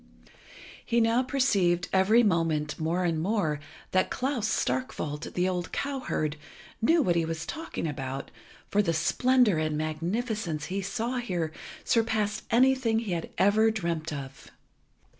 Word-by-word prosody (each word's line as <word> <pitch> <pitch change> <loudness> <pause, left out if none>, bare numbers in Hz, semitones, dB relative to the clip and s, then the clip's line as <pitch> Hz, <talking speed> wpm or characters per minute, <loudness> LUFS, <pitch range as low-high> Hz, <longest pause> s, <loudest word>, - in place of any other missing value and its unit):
He 235 -1 +1
now 230 +2 +3
perceived 200 -10 +2
every 205 +5 +5
moment 165 -6 +1
more 165 +3 0
and 165 -3 0
more, 175 -6 0 0.3
that 185 0 +2
Klas 255 -4 -1
Starkwolt, 155 - -2
the 180 +1 +2
old 180 -2 -2
cowherd, 255 - -2 0.4
knew 320 +7 +4
what 175 -7 +2
he 170 - +2
was 160 0 -4
talking 320 - -5
about, 135 -3 -4 0.4
for 205 - +2
the 170 -5 0
splendour 230 +3 +3
and 155 -1 -1
magnificence 170 +2 -2
he 195 +2 -3
saw 225 +6 -2
here 180 -10 -2 0.3
surpassed 220 -2 0
anything 255 -2 +3
he 225 -4 -2
had 170 -2 -2
ever 215 +3 +4
dreamt 170 -7 -2
of. 135 -2 -7
185 Hz, 140 wpm, -28 LUFS, 160-230 Hz, 0.4 s, every